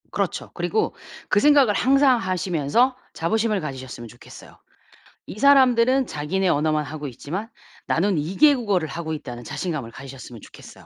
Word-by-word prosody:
그렇죠. - - -3
그리고 435 -1 -1 0.3
그 210 - +3
생각을 285 -4 +5
항상 270 +3 +4
하시면서 185 - 0 0.2
자부심을 210 +4 0
가지셨으면 130 -5 -7
좋겠어요. 120 +2 -15 0.7
'이 210 - -8
사람들은 260 -1 +4
자기네 180 +6 -2
언어만 155 0 +1
하고 150 +1 -6
있지만 170 - -6 0.4
나는 185 +2 +1
2 155 +6 -3
개 300 -1 +6
국어를 200 -10 -1
하고 160 0 -5
있다.'는 125 -6 -7
자신감을 145 -3 -4
가지셨으면 130 -3 -11
좋겠어요. - - -14
180 Hz, 380 characters per minute, -23 LUFS, 145-235 Hz, 0.7 s, 개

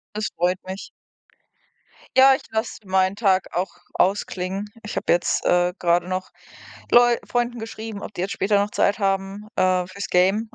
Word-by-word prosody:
Das 215 - -1
freut 180 +2 +1
mich. 190 +1 -7 1.3
Ja, 265 +1 +8
ich - - -4
lasse 220 +1 -2
meinen 190 +1 +2
Tag 195 -5 +1
auch 180 +2 -1 0.2
ausklingen. 195 +1 -1
Ich 210 - -7
habe - - +1
jetzt, 175 - +1
äh, 180 0 +3
gerade 175 0 +1
noch 185 0 -3 0.6
Leu 240 0 +6
Freunden 240 0 -1
geschrieben, 220 -2 -7
ob - - -7
die - - -5
jetzt 195 - -2
später 200 +1 +1
noch 205 +1 -1
Zeit 200 0 +1
haben, 195 +1 -1
äh, 185 -1 +2
fürs 200 +2 -6
Gamen 195 +5 +2
195 Hz, 165 wpm, -23 LUFS, 185-215 Hz, 1.3 s, Ja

